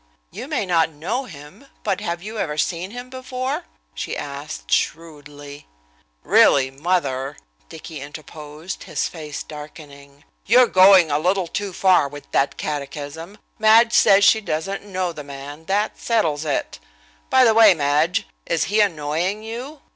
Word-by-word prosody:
"You -, -, -7 dB
may -, -, -1 dB
not 165 Hz, -3 st, +2 dB
know 185 Hz, -, -4 dB
him, 175 Hz, -, -13 dB, 0.2 s
but 195 Hz, -3 st, -1 dB
have 170 Hz, +1 st, -4 dB
you 215 Hz, +1 st, -6 dB
ever 150 Hz, -5 st, -2 dB
seen 175 Hz, +3 st, -1 dB
him 245 Hz, +3 st, -9 dB
before?" 255 Hz, 0 st, -4 dB, 0.3 s
she -, -, -5 dB
asked, -, -, -7 dB
shrewdly. 145 Hz, -2 st, -3 dB, 0.6 s
"Really, 130 Hz, -1 st, +4 dB
mother," 140 Hz, -3 st, -2 dB, 0.3 s
Dicky 155 Hz, -4 st, -9 dB
interposed, 150 Hz, +3 st, -9 dB
his -, -, -2 dB
face 155 Hz, -3 st, -7 dB
darkening, 145 Hz, -2 st, -12 dB, 0.2 s
"you're 245 Hz, +4 st, +6 dB
going 185 Hz, -5 st, +6 dB
a 145 Hz, -, +2 dB
little 185 Hz, +3 st, +1 dB
too 200 Hz, +4 st, -4 dB
far 185 Hz, -4 st, +3 dB
with 145 Hz, +1 st, -12 dB
that 140 Hz, 0 st, +1 dB
catechism. 150 Hz, +5 st, -6 dB, 0.2 s
Madge 225 Hz, +2 st, +5 dB
says 195 Hz, 0 st, +5 dB
she 220 Hz, +2 st, +5 dB
doesn't 195 Hz, +2 st, -3 dB
know 185 Hz, -3 st, -3 dB
the 150 Hz, -, -8 dB
man, 140 Hz, +2 st, -10 dB
that 205 Hz, +3 st, -1 dB
settles 160 Hz, -10 st, 0 dB
it. 145 Hz, -, -2 dB, 0.5 s
By 260 Hz, 0 st, +5 dB
the 225 Hz, -3 st, +5 dB
way, 220 Hz, -4 st, +7 dB
Madge, 150 Hz, +3 st, +1 dB, 0.2 s
is 165 Hz, -, +1 dB
he 215 Hz, -, +3 dB
annoying 175 Hz, +3 st, -1 dB
you? 250 Hz, +7 st, -7 dB
165 Hz, 145 wpm, -21 LUFS, 145-205 Hz, 0.6 s, way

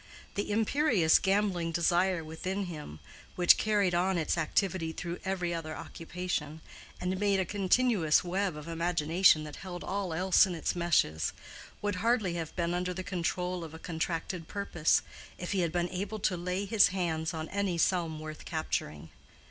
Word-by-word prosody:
The 205 Hz, -, -2 dB
imperious 220 Hz, -, +3 dB
gambling 190 Hz, -4 st, +1 dB
desire 175 Hz, +1 st, +2 dB
within 185 Hz, +5 st, -3 dB
him, 150 Hz, -, -7 dB, 0.4 s
which 175 Hz, -1 st, +6 dB
carried 205 Hz, -4 st, +2 dB
on 180 Hz, +2 st, +2 dB
its 160 Hz, -, 0 dB
activity 165 Hz, 0 st, 0 dB
through 175 Hz, +1 st, -5 dB
every 180 Hz, -3 st, -1 dB
other 160 Hz, -1 st, -4 dB
occupation, 165 Hz, -3 st, -4 dB, 0.4 s
and 185 Hz, +1 st, -2 dB
made 200 Hz, -1 st, +2 dB
a 190 Hz, -, +1 dB
continuous 195 Hz, -3 st, +2 dB
web 185 Hz, -1 st, -1 dB
of 150 Hz, -, -9 dB
imagination 165 Hz, 0 st, +3 dB
that 150 Hz, -1 st, -8 dB
held 180 Hz, -2 st, -7 dB
all 195 Hz, -3 st, -2 dB
else 185 Hz, +4 st, +4 dB
in 180 Hz, -, -4 dB
its 165 Hz, -, -2 dB
meshes, 165 Hz, -, +1 dB, 0.5 s
would 205 Hz, -2 st, -1 dB
hardly 220 Hz, -3 st, +1 dB
have 165 Hz, -2 st, -5 dB
been 170 Hz, -1 st, 0 dB
under 180 Hz, 0 st, -2 dB
the 185 Hz, -, -4 dB
control 180 Hz, -1 st, -2 dB
of 160 Hz, -1 st, -8 dB
a -, -, -7 dB
contracted 165 Hz, +1 st, -3 dB
purpose, 200 Hz, -6 st, +1 dB, 0.3 s
if 175 Hz, -, -5 dB
he 195 Hz, -, 0 dB
had 170 Hz, -3 st, +1 dB
been 175 Hz, +1 st, 0 dB
able 200 Hz, +4 st, -4 dB
to 195 Hz, -2 st, 0 dB
lay 180 Hz, +3 st, -2 dB
his 200 Hz, 0 st, +5 dB
hands 170 Hz, -4 st, -1 dB
on 160 Hz, -2 st, -4 dB
any 195 Hz, -3 st, -1 dB
sum 165 Hz, -2 st, +1 dB
worth 155 Hz, 0 st, -8 dB
capturing. 80 Hz, -, -3 dB
180 Hz, 165 wpm, -30 LUFS, 165-190 Hz, 0.5 s, which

